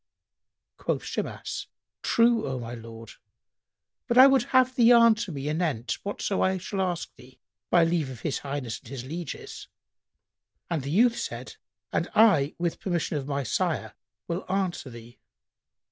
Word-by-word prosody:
Quoth - - -2
Shimas, - - -4 0.3
"True, 230 -5 +3
O 130 -1 -2
my 120 -1 -6
lord; 115 -1 -10 1.0
but 240 - +1
I 260 - +11
would 270 -3 +4
have 255 -1 +3
thee 240 -2 +5
answer 230 -3 +5
me 140 -2 -5
anent 150 -7 -1
whatso 200 -1 -2
I 190 0 +2
shall 190 +2 -3
ask 175 -3 -2
thee, 130 0 -17 0.3
by 175 -1 +5
leave 165 -4 0
of 125 -3 -9
His 150 - -2
Highness 135 -5 -4
and - - -18
his 130 0 -7
lieges." 165 +2 -7 1.0
And 165 -4 0
the 135 - -5
youth 235 +9 +3
said, - - -6 0.4
"And - - 0
I, 160 -10 +5
with 170 -1 -2
permission 170 -4 -1
of 135 - -7
my 140 -1 -1
sire, 120 - -1 0.3
will 170 +2 -3
answer 185 -7 -1
thee." 120 0 -13
165 Hz, 155 wpm, -27 LUFS, 135-205 Hz, 1.0 s, I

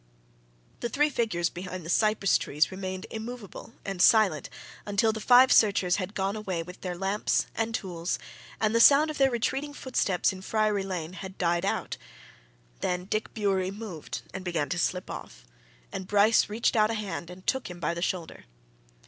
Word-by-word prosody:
The 235 - -2
three 295 +5 +2
figures 195 -9 0
behind 180 -1 -7
the - - -7
cypress 210 0 +3
trees 150 +3 0
remained 185 +1 -5
immovable 225 -1 -7
and 195 -2 -3
silent 200 -10 +4 0.3
until 205 +2 +2
the 220 - -5
five 250 +3 +6
searchers 200 -4 +4
had 200 +1 -4
gone 195 +1 -1
away 190 -6 -3
with 180 +2 -12
their 180 -2 -4
lamps 195 +3 0
and 225 0 -1
tools 175 -4 -3 0.4
and 215 0 +1
the 230 - +3
sound 290 +5 +7
of 300 - -7
their 270 -1 +5
retreating 270 +4 -2
footsteps 195 -11 0
in 185 - -9
Friary 215 0 +1
Lane 180 -3 -4
had 190 +1 -8
died 175 0 +1
out. - - -2 0.8
Then 180 0 -2
Dick 215 +2 -2
Bewery 195 -4 +1
moved 195 -6 -7
and 190 - -5
began 170 -5 -1
to 180 - -1
slip 180 +1 -1
off, - - -9 0.5
and 190 - -5
Bryce 210 +3 +4
reached 225 +4 0
out 215 -1 +4
a 225 - -1
hand 200 -5 -5
and 180 +1 -12
took 265 -5 -1
him 175 -1 -9
by 165 0 -1
the 170 - -5
shoulder. 175 - -3
195 Hz, 180 wpm, -28 LUFS, 180-220 Hz, 0.8 s, sound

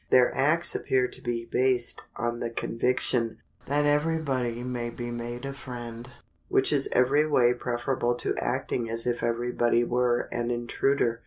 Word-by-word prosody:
Their 125 -1 +5
acts 165 +5 +3
appear 130 -1 +1
to - - -4
be 120 -1 -3
based 125 0 +1
on 120 +2 -2
the 120 - -2
conviction 115 0 0 0.3
that 145 +1 +1
every 150 +3 +2
body 125 -6 -2
may 120 -1 -3
be 120 0 -6
made 120 +2 -5
a 140 - -4
friend, 120 -2 -8 0.4
which - - +3
is - - +3
every 140 +5 +3
way 125 -5 +4
preferable 120 0 -1
to - - -1
acting 120 -2 -2
as 115 0 +1
if 120 -1 -1
every 120 +1 -1
body 120 0 +2
were 120 0 +1
an 120 0 -2
intruder. 120 0 0
120 Hz, 165 wpm, -27 LUFS, 120-130 Hz, 0.4 s, Their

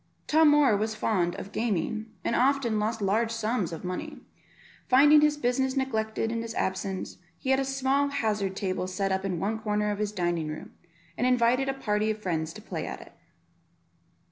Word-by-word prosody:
Tom 315 0 +5
Moor 295 -6 +5
was 220 +2 -1
fond 180 -5 0
of 200 - -8
gaming, 220 0 -1 0.2
and 235 - 0
often 255 -4 +2
lost 220 0 -1
large 220 +4 +2
sums 225 -4 -1
of 165 - -7
money; 180 0 -5 0.7
finding 290 +4 +7
his 300 0 +3
business 265 0 0
neglected 225 -4 -1
in 230 0 -2
his 230 -1 -6
absence, 190 0 -3 0.2
he 265 - -2
had 265 - +4
a - - +1
small 270 +1 +1
hazard 215 -8 -1
table 185 -2 -2
set 195 +1 -2
up 190 0 0
in 185 -4 -2
one 215 +5 -1
corner 210 -1 0
of 205 - -4
his 210 -1 -1
dining 175 -5 -1
room, 155 0 -7 0.5
and 250 - +2
invited 250 +2 +3
a - - +1
party 215 -4 0
of 215 - -1
his 215 - -21
friends 160 -3 -1
to 215 - -11
play - - -5
at - - -6
it. - - -14
220 Hz, 195 wpm, -27 LUFS, 195-260 Hz, 0.7 s, finding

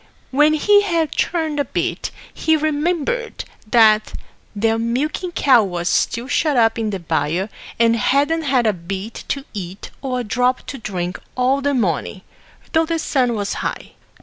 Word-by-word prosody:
When 300 +3 +4
he 410 +6 +5
had 335 -6 0
churned 320 -4 -1
a - - +3
bit, 260 - -2 0.2
he 320 -1 +2
remembered 325 - -1 0.3
that 215 -2 +4 0.4
their 225 +2 +1
milking 285 +10 -1
cow 265 -7 +5
was 175 -3 -3
still 235 +2 0
shut 295 -1 +1
up 225 0 +3
in 220 -1 -1
the 200 - -2
byre, 170 +2 -1 0.3
and 230 0 +4
hadn't 285 +8 +2
had 265 -5 +1
a 215 - +3
bit 190 +5 -6
to 275 -1 -3
eat 190 -1 -7
or 255 -2 -2
a - - -4
drop 250 +3 0
to 270 - -7
drink 180 -4 -4 0.2
all 260 +2 +2
the 285 0 +1
morning, 185 - -1 0.5
though 320 -1 +3
the 330 0 0
sun 255 -6 +1
was 205 -2 -2
high. - - -4
250 Hz, 165 wpm, -20 LUFS, 215-305 Hz, 0.5 s, he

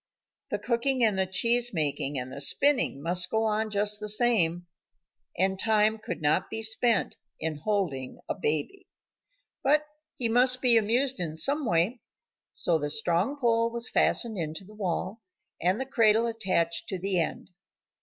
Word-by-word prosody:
The - - -2
cooking 250 +1 0
and 210 -4 +2
the 190 - 0
cheese 235 +4 +2
making 145 -2 0
and 125 0 -5
the 140 - -6
spinning 255 - +1
must 175 +1 +1
go 220 0 0
on 215 0 -1
just 210 0 +3
the 210 0 -3
same, 205 -7 +2 0.7
and 190 +1 0
time 220 0 +2
could 170 -6 -7
not 150 +5 +1
be 220 0 -5
spent 220 0 +1 0.2
in 160 -1 -3
holding 150 -8 -3
a - - -2
baby. 155 - -2 0.8
But 300 +2 +2 0.3
he 240 - -1
must 250 +2 +4
be 250 -2 +4
amused 245 +5 +1
in 160 -3 -4
some 280 - +1
way. 180 +7 0 0.5
So 165 -2 0
the 145 0 -3
strong 190 - 0
pole 230 -2 +1
was 235 +1 -3
fastened 225 -5 +1
into 160 +3 -5
the 210 - -15
wall, 195 +1 -4 0.4
and 185 +6 +1
the 265 - -3
cradle 230 -3 +3
attached 185 -7 -1
to 190 - -3
the 190 0 -1
end. 165 - -4
210 Hz, 165 wpm, -27 LUFS, 170-235 Hz, 0.8 s, must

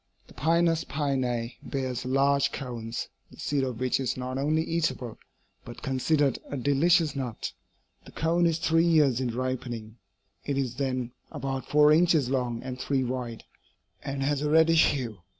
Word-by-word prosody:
The - - -17
Pinus 165 +1 +2
pinea 130 -5 -1
bears 130 -2 -3
large 140 +2 +2
cones, 120 -3 -5 0.2
the - - -16
seed 145 -2 -1
of 125 -3 -3
which 130 0 +1
is 130 -1 -1
not 130 +1 -3
only 155 +3 +1
eatable, 140 -8 -2 0.4
but 120 - -11
considered 135 +2 +1
a 145 - -4
delicious 145 +4 +3
nut. 125 -5 -4 0.5
The - - -12
cone 170 +2 +2
is 165 -1 +1
three 165 -1 +2
years 150 -7 +3
in 120 -3 -2
ripening; 120 -3 -4 0.5
it 140 -1 -2
is 130 -3 -1
then 130 -3 -2 0.2
about 135 0 -4
four 150 0 +6
inches 155 -5 +4
long 125 -3 -1
and 130 -1 -6
three 135 0 0
wide, 125 -2 -4 0.6
and 135 -1 -3
has 145 0 0
a 150 - 0
reddish 160 +1 +5
hue. 120 -7 -3
135 Hz, 160 wpm, -27 LUFS, 125-150 Hz, 0.6 s, four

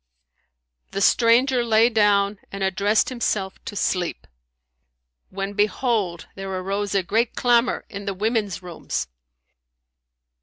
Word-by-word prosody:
The 195 - -1
stranger 245 +4 +4
lay 225 0 +4
down 205 -3 +2
and 195 0 -4
addressed 200 +3 +2
himself 210 -6 -2
to - - -6
sleep, 180 -3 -1 1.0
when, 195 +1 -4
behold, 210 -3 0
there 195 0 -6
arose 195 +2 -2
a 195 - +2
great 225 +6 0
clamour 240 0 +2
in 200 -1 -8
the 200 -2 -3
women's 210 -2 -1
rooms. 175 -2 -4
205 Hz, 115 wpm, -23 LUFS, 195-230 Hz, 1.0 s, stranger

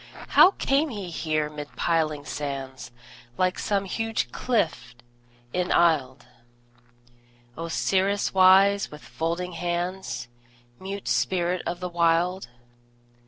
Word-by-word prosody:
How 380 - +7
came 285 +3 +1
he 200 -7 -6
here 155 -2 -1
mid 150 -1 -9
piling 155 -3 0
sands, 135 -4 -5 0.5
Like 185 0 +1
some 200 -1 0
huge 225 +3 -2
cliff 215 - -1 0.6
enisled, 160 -7 +1 1.3
Osiris 190 +4 0
wise, 195 +2 +5
with 150 - -12
folded 170 +2 -3
hands, 175 -8 -3 0.5
Mute 195 +1 -6
spirit 180 -1 0
of 175 +1 -4
the 180 - -3
Wild? 175 +2 +1
175 Hz, 100 wpm, -25 LUFS, 155-190 Hz, 1.3 s, How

